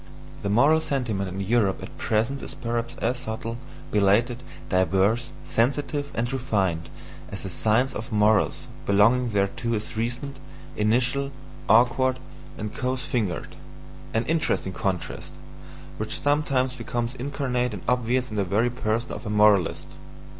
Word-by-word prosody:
The 100 - -2
moral 140 +10 +5
sentiment 115 -10 -1
in 95 +1 -5
Europe 100 -1 +1
at - - -9
present 115 +6 0
is - - -8
perhaps 115 0 -3
as 125 0 -1
subtle, 115 +1 -5 0.3
belated, 110 +5 +3 0.3
diverse, 95 +6 +2
sensitive, 140 +4 0
and 120 +3 -1
refined, 95 -11 0 0.4
as 100 - -4
the 95 - -4
"Science 115 +8 +2
of 115 +4 -6
Morals" 105 0 +3 0.2
belonging 115 +5 +4
thereto 105 +3 0
is 105 +1 -4
recent, 120 +5 -2 0.4
initial, 125 +6 +1 0.4
awkward, 125 +4 +4 0.4
and 105 0 -5
coarse 130 +2 -2
fingered: 110 - -2 0.6
an 115 +1 0
interesting 155 - 0
contrast, 95 -2 -3 0.6
which - - -1
sometimes 140 -3 +1
becomes 120 -1 -3
incarnate 125 -2 -1
and 100 -4 -7
obvious 125 0 +1
in 105 - -4
the 100 - +2
very 105 +6 +1
person 115 0 -1
of - - -6
a - - -2
moralist. 105 -3 +4
115 Hz, 135 wpm, -25 LUFS, 105-130 Hz, 0.6 s, moral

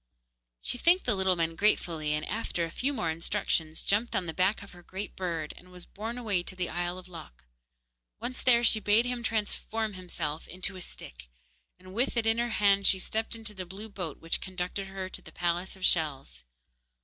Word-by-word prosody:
She 245 - 0
thanked 350 +6 +5
the 245 - +3
little 190 -1 +3
men 165 -1 0
gratefully, 165 -6 +2
and 150 - -3
after 195 -5 -1
a 165 - -7
few 270 +9 0
more 195 - 0
instructions, 160 0 0
jumped 215 +4 +2
on 185 - +1
the 165 - -3
back 190 +5 +2
of 200 - -12
her 175 - -13
great 190 +4 -6
bird, 165 -5 -2
and 180 - -14
was 180 -1 -10
borne 225 +4 -5
away 210 -7 +1
to 180 - -5
the 180 -1 -2
isle 175 +1 -1
of 185 0 -10
Lok. 165 - -11 0.8
Once 245 +3 -4
there, 240 -2 +5
she 220 -1 +5
bade 215 +3 +4
him 245 -1 -2
transform 220 -1 -1
himself 170 -4 -4
back - - -8
into 185 +1 -2
a 185 - -7
stick, - - -7 0.5
and 185 +1 -13
with 240 +3 +1
it 230 - +2
in 225 +1 +4
her 240 0 +1
hand 200 -3 +4
she 190 - +5
stepped 220 +4 -1
into 220 -2 -2
the 190 -2 -5
blue 200 +5 -8
boat, 180 -7 -5
which 165 - -1
conducted 185 +1 -3
her 190 -1 -4
to - - -7
the - - -12
palace 175 +2 -1
of 190 - -2
shells. 135 - +1
190 Hz, 210 wpm, -30 LUFS, 170-220 Hz, 0.8 s, thanked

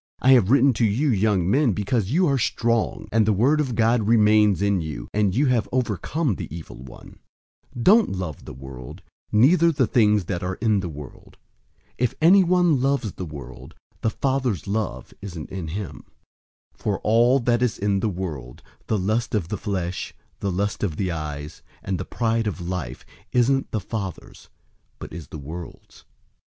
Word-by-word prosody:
I 130 - +4
have 120 -7 +5
written 135 +1 +5
to - - +4
you, 115 +8 +2
young 100 -4 +1
men, 130 +2 +3
because 105 +1 -1
you 175 +8 +3
are 140 -4 +2
strong, 115 0 0
and 110 -1 +4
the - - +4
word 135 +10 +3
of 130 -5 -2
God 115 -1 +2
remains 105 -3 +4
in 100 -2 +1
you, 75 -7 -6
and 105 -2 +1
you 140 +4 +3
have 125 -4 +1
overcome 125 - -1
the - - -5
evil 80 +1 -9
one. 65 +1 -13 0.6
002:015 120 - -3
Don't 215 +3 +6
love 90 -6 -5
the - - -8
world, 65 -2 -10 0.3
neither 165 +10 +5
the 135 -4 +2
things 105 -4 +3
that 90 0 -3
are 95 0 -3
in 105 -1 +1
the 90 -2 -4
world. 75 -3 -11 0.6
If 125 -1 0
anyone 175 -3 +4
loves 135 -6 0
the 90 - -6
world, 75 -2 -10 0.3
the 110 - +1
Father's 130 - -1
love 100 - -3
isn't 85 -7 -7
in 95 -4 -5
him. 95 +3 -6 0.7
002:016 - - -34
For 100 -2 -1
all 120 +5 +4
that 120 -1 +1
is 125 -3 +1
in 100 -1 0
the 110 - 0
world, 80 -10 -6 0.2
the 110 - +1
lust 110 +5 -1
of 90 -6 -1
the 105 - -2
flesh, 90 -3 -3 0.2
the 100 - -2
lust 100 +3 -2
of 90 -7 -1
the 95 0 -1
eyes, 75 -1 -6 0.2
and 95 -3 -2
the - - -4
pride 115 -1 -1
of 100 - -3
life, 90 +1 -5 0.3
isn't 135 +2 +2
the 110 - -2
Father's, 100 -2 -7 0.5
but - - -9
is 85 -1 -8
the - - -8
world's. 80 +4 -10
105 Hz, 180 wpm, -23 LUFS, 90-125 Hz, 0.7 s, Don't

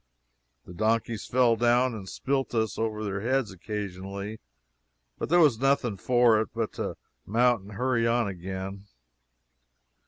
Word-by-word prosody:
The 90 - -11
donkeys 110 +2 0
fell 120 -2 +4
down 120 +2 +3
and 100 -4 -7
spilt 135 +4 -2
us 110 -1 0
over 110 -1 -2
their 100 -1 -3
heads 130 -1 0
occasionally, 100 +1 -6 0.8
but - - -3
there 175 - +5
was 145 -9 +5
nothing 135 -5 +2
for 120 0 +4
it 110 - -3
but 115 -2 -2
to - - -4 0.3
mount 120 +1 +2
and 100 +2 -12
hurry 125 +1 +1
on 120 -1 +2
again. 95 +1 -6
110 Hz, 145 wpm, -27 LUFS, 100-120 Hz, 0.8 s, there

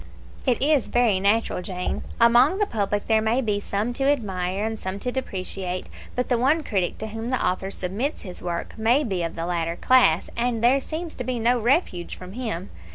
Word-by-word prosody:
"It 245 -3 +3
is 295 -2 +3
very 235 -6 +3
natural, 205 0 +1
Jane. 180 -1 -3 0.2
Among 240 +9 +5
the 415 - +2
public 205 - -1
there 220 -1 +3
may 220 +3 +2
be 210 -5 0
some 205 +4 -2
to 270 +2 -1
admire, 195 -7 0
and 220 -1 -3
some 190 +1 -4
to 250 - -2
depreciate; 185 -6 -4 0.3
but 250 - 0
the 245 -2 +1
one 300 +6 +3
critic 190 -8 -1
to 220 - -5
whom 225 +2 -5
the 255 - 0
author 185 +1 -1
submits 200 +10 -3
his 180 -4 -8
work 170 -1 -4
may 240 +7 +3
be 190 -8 -2
of 165 -1 -3
the 165 - -3
latter 170 -1 -1
class, 215 -8 +4
and 235 -1 -1
there 265 +3 +5
seems 320 +3 -5
to 250 - -3
be 250 0 -2
no 240 +2 +2
refuge 230 - 0
from 185 +1 -10
him. 220 -7 -4
220 Hz, 205 wpm, -24 LUFS, 185-250 Hz, 0.3 s, Among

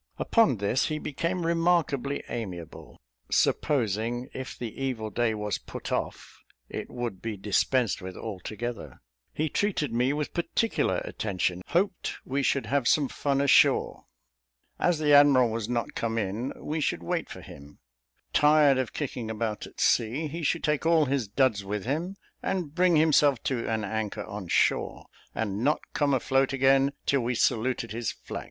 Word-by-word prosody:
Upon 225 - +3
this, 100 +5 +1
he 155 - -2
became 170 +4 -2
remarkably 165 -5 +1
amiable, 90 -9 -7 0.3
supposing 120 -1 0
if 130 0 -6
the 115 -3 -6
evil 115 -5 -2
day 115 -1 0
was 105 -1 -2
put - - -8
off, - - -4 0.3
it - - -6
would 120 -6 -5
be 110 -2 -4
dispensed 105 +1 +1
with 95 0 -7
altogether; 110 +3 -6 0.3
he 155 - -1
treated 155 - -1
me 125 +3 +2
with 150 0 -3
particular 220 +6 0
attention, 90 -3 -2
hoped 180 +1 0
we 135 +2 -1
should 135 -2 +1
have 135 +1 0
some 145 -4 +3
fun 140 -1 0
ashore; 140 - +3 0.7
as 175 -2 +2
the 150 -1 +2
admiral 140 -5 +6
was 110 0 -3
not 120 -1 -2
come 115 -1 -2
in, 110 +4 -2
we 155 +1 -3
should 85 - -1
wait 85 - -2
for - - -9
him; 70 0 -13 0.6
tired 150 -2 +5
of 130 - -2
kicking 125 -6 -4
about 110 -1 -3
at - - -16
sea, 120 +8 +2
he 160 +3 -5
should 165 +2 0
take 150 -2 +1
all 165 -2 +4
his 130 -4 -1
duds, 110 -2 +1
with 105 +1 -4
him, 165 +9 -2 0.3
and 175 -6 -2
bring 180 0 +3
himself 150 -4 +4
to 125 -4 -2
an 110 -1 -1
anchor 105 +1 -3
on 100 -3 -7
shore, - - +1 0.3
and 105 0 -2
not 150 +3 +2
come 145 -2 +1
afloat 135 +1 +2
again 135 +1 +4
till 140 -2 +2
we 120 +1 -1
saluted 115 0 0
his 115 +1 -2
flag. - - -7
130 Hz, 160 wpm, -27 LUFS, 110-150 Hz, 0.7 s, admiral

